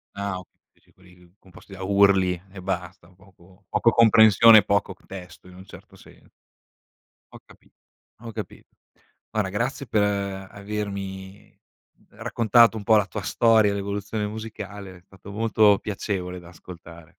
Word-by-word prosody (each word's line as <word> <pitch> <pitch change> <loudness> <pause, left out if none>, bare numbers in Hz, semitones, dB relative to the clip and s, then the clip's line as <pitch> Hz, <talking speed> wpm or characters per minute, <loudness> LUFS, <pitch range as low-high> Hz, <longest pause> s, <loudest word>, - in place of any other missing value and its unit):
Ah 100 -2 -4
ok 90 - -11 0.3
dici - - -31
quelli 90 -1 -22
composti 95 +1 -17
da 95 - -10
urli 95 -2 +3
e 95 -2 -10
basta, 85 - -5
poco 95 0 -23
poco 115 - +2
comprensione 110 -1 +7
e - - -2
poco 100 -2 0
p - - -28
testo, 90 -2 -11
in 90 - -15
un 95 +1 -13
certo - - -15
sen - - -19 1.0
Ho - - -13
capi - - -22 0.5
ho 115 -1 -9
capito. - - -9 0.6
Guarda 105 -3 -1
grazie 120 +6 -3
per 110 - -2
avermi 100 -1 -5 0.5
raccontato 115 0 +2
un 105 - -7
po' 110 +2 +4
la 100 - +2
tua 105 -3 -6
storia, 110 -2 +3
l'evoluzione 100 +1 -4
musicale, 105 -3 -9
è - - -20
stato 95 +1 -14
molto 105 -1 +3
piacevole 95 -3 -5
da 85 -1 -15
ascoltare. 85 -2 -14
100 Hz, 145 wpm, -24 LUFS, 95-105 Hz, 1.0 s, comprensione